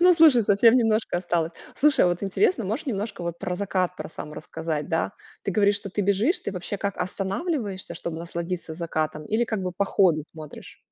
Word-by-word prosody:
Ну, 360 Hz, 0 st, +7 dB
слушай, 305 Hz, -8 st, +7 dB
совсем 210 Hz, +4 st, +5 dB
немножко 225 Hz, -6 st, +2 dB
осталось. 170 Hz, -2 st, -1 dB, 0.2 s
Слушай, 295 Hz, -5 st, +4 dB
а -, -, +4 dB
вот 175 Hz, +1 st, -2 dB
интересно, 235 Hz, -, +2 dB
можешь 225 Hz, +11 st, -3 dB
немножко 200 Hz, -7 st, -2 dB
про 180 Hz, +2 st, -4 dB
закат 185 Hz, -2 st, -1 dB
про -, -, -6 dB
сам 150 Hz, -1 st, -8 dB
рассказать, 160 Hz, -2 st, -4 dB
да? 165 Hz, -, 0 dB, 0.3 s
Ты -, -, -1 dB
говоришь, 200 Hz, +1 st, +3 dB
что 200 Hz, -2 st, -6 dB
ты 205 Hz, -, -1 dB
бежишь, 200 Hz, -, +2 dB
ты -, -, -4 dB
вообще 185 Hz, +2 st, -4 dB
как 200 Hz, -1 st, -2 dB
останавливаешься, 195 Hz, -, -2 dB
чтоб 170 Hz, 0 st, -5 dB
насладиться 170 Hz, 0 st, -4 dB
закатом? 155 Hz, -2 st, -2 dB
Или 225 Hz, +3 st, +1 dB
как 220 Hz, -3 st, -2 dB
бы 180 Hz, -, -2 dB
по 200 Hz, +3 st, 0 dB
ходу 170 Hz, -6 st, +3 dB
смотришь? 155 Hz, -2 st, -11 dB
195 Hz, 190 wpm, -25 LUFS, 170-220 Hz, 0.3 s, Ну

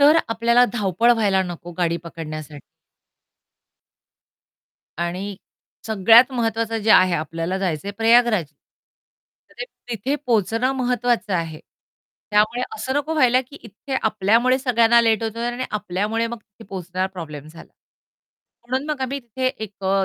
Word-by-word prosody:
तर 295 Hz, +3 st, +6 dB
आपल्याला 235 Hz, +2 st, +4 dB
धावपळ 220 Hz, +1 st, +2 dB
व्हायला 200 Hz, -4 st, +2 dB
नको 175 Hz, -1 st, -7 dB
गाडी 170 Hz, -1 st, +1 dB
पकडण्यासाठ 155 Hz, -3 st, -8 dB, 2.4 s
आणि 185 Hz, +4 st, -3 dB, 0.5 s
सगळ्यात 225 Hz, +5 st, +5 dB
महत्वाचं 225 Hz, -1 st, -1 dB
जे 220 Hz, -, +1 dB
आहे 185 Hz, -2 st, +6 dB
आपल्याला 165 Hz, +3 st, -3 dB
जायचं 175 Hz, -4 st, -2 dB
आहे -, -, -4 dB
प्रयागराज. 230 Hz, -4 st, +4 dB, 1.1 s
तर -, -, -21 dB
ते -, -, -1 dB, 0.2 s
तिथे 240 Hz, +4 st, -2 dB
पोहोचणं 230 Hz, +3 st, +1 dB
महत्वाचं 245 Hz, -4 st, 0 dB
आहे. 165 Hz, -2 st, -3 dB, 0.7 s
त्यामुळे 215 Hz, +4 st, +2 dB
असं 265 Hz, -9 st, -3 dB
नको 290 Hz, +2 st, -1 dB
व्हायला, 255 Hz, -4 st, +4 dB
की 260 Hz, +3 st, -13 dB
इथे 225 Hz, +5 st, -8 dB
आपल्यामुळे 220 Hz, +5 st, +2 dB
सगळ्यांना 235 Hz, -2 st, +4 dB
लेट 225 Hz, -2 st, +2 dB
होत 225 Hz, 0 st, -3 dB
आहे 235 Hz, +1 st, -2 dB
आणि 255 Hz, +1 st, -4 dB
आपल्यामुळे 210 Hz, +3 st, -2 dB
मग 235 Hz, 0 st, -6 dB
तिथे 210 Hz, +1 st, -18 dB
पोहोचणारा 185 Hz, 0 st, -3 dB
प्रॉब्लेम 155 Hz, -6 st, -8 dB
झाला. 165 Hz, +1 st, -14 dB, 1.0 s
म्हणून 260 Hz, +3 st, -1 dB
मग 295 Hz, -, -3 dB
आम्ही 270 Hz, +2 st, -2 dB
तिथे 250 Hz, +2 st, -4 dB, 0.2 s
एक 200 Hz, -2 st, -12 dB
अ, 195 Hz, 0 st, +2 dB
220 Hz, 140 wpm, -22 LUFS, 185-240 Hz, 2.4 s, तर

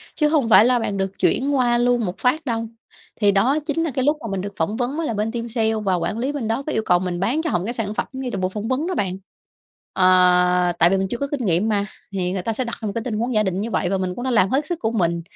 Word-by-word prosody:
chứ 300 Hz, -, +2 dB
hông 295 Hz, -7 st, +1 dB
phải 220 Hz, -, +7 dB
là 250 Hz, 0 st, +3 dB
bạn 205 Hz, -3 st, -2 dB
được 195 Hz, 0 st, -1 dB
chuyển 280 Hz, +2 st, +1 dB
qua 240 Hz, -2 st, +2 dB
luôn 240 Hz, -1 st, +2 dB
một 180 Hz, -1 st, -4 dB
phát 285 Hz, +5 st, 0 dB
đâu. 230 Hz, -3 st, -2 dB, 0.5 s
Thì 205 Hz, -2 st, +3 dB
đó 245 Hz, +10 st, +2 dB
chính 325 Hz, +1 st, -1 dB
là 325 Hz, -, -1 dB
cái 260 Hz, 0 st, -1 dB
lúc 295 Hz, +2 st, +2 dB
mà -, -, -5 dB
mình 195 Hz, -1 st, -2 dB
được 200 Hz, +1 st, -6 dB
phỏng 165 Hz, +7 st, -1 dB
vấn 260 Hz, +5 st, -2 dB
á 330 Hz, -, -1 dB
là 230 Hz, -, -2 dB
bên 215 Hz, +1 st, -1 dB
team 235 Hz, 0 st, -4 dB
sale 225 Hz, -1 st, 0 dB
và 200 Hz, -4 st, 0 dB
quản 180 Hz, +5 st, -2 dB
lý 255 Hz, +4 st, -1 dB
bên 280 Hz, -6 st, -4 dB
đó 225 Hz, +5 st, -1 dB
có 310 Hz, -, -2 dB
yêu 220 Hz, -, 0 dB
cầu 175 Hz, -, +3 dB
mình 180 Hz, -1 st, -3 dB
bán 235 Hz, -, +1 dB
cho 330 Hz, -, -2 dB
họ 180 Hz, -, +1 dB
một 175 Hz, -, -4 dB
cái 235 Hz, -, -3 dB
sản 220 Hz, -4 st, -3 dB
phẩm -, -, -2 dB
ngay 260 Hz, -1 st, -4 dB
tại 200 Hz, -, -3 dB
buổi 185 Hz, -, 0 dB
phỏng 215 Hz, +1 st, -4 dB
vấn 260 Hz, +6 st, -1 dB
đó 370 Hz, -, -2 dB
bạn. 185 Hz, -2 st, -1 dB, 0.8 s
Ờ, 180 Hz, -1 st, +4 dB
tại 170 Hz, -, +6 dB
vì 195 Hz, -, +2 dB
mình 190 Hz, 0 st, -1 dB
chưa 240 Hz, -, -3 dB
có 280 Hz, -, -2 dB
kinh 275 Hz, -5 st, -2 dB
nghiệm 185 Hz, +4 st, +1 dB
mà, 205 Hz, -2 st, +1 dB, 0.3 s
thì 180 Hz, -2 st, -1 dB
người 190 Hz, 0 st, -2 dB
ta 225 Hz, +5 st, -2 dB
sẽ 255 Hz, -, -2 dB
đặt 235 Hz, -1 st, -5 dB
ra 225 Hz, -, -6 dB
một 205 Hz, -, -1 dB
cái 230 Hz, -, -2 dB
tình 230 Hz, -3 st, -3 dB
huống 240 Hz, +3 st, -1 dB
giả 215 Hz, -1 st, +3 dB
định 190 Hz, -1 st, -1 dB
như 230 Hz, +2 st, -4 dB
vậy 180 Hz, -, 0 dB
và 195 Hz, -, 0 dB
mình 185 Hz, -1 st, -3 dB
cũng 245 Hz, -, -6 dB
đã 260 Hz, -, -1 dB
làm 195 Hz, -5 st, +3 dB
hết 275 Hz, +5 st, 0 dB
sức 340 Hz, +1 st, -4 dB
của 225 Hz, -, -1 dB
mình 170 Hz, -6 st, 0 dB
225 Hz, 325 wpm, -21 LUFS, 190-255 Hz, 0.8 s, phải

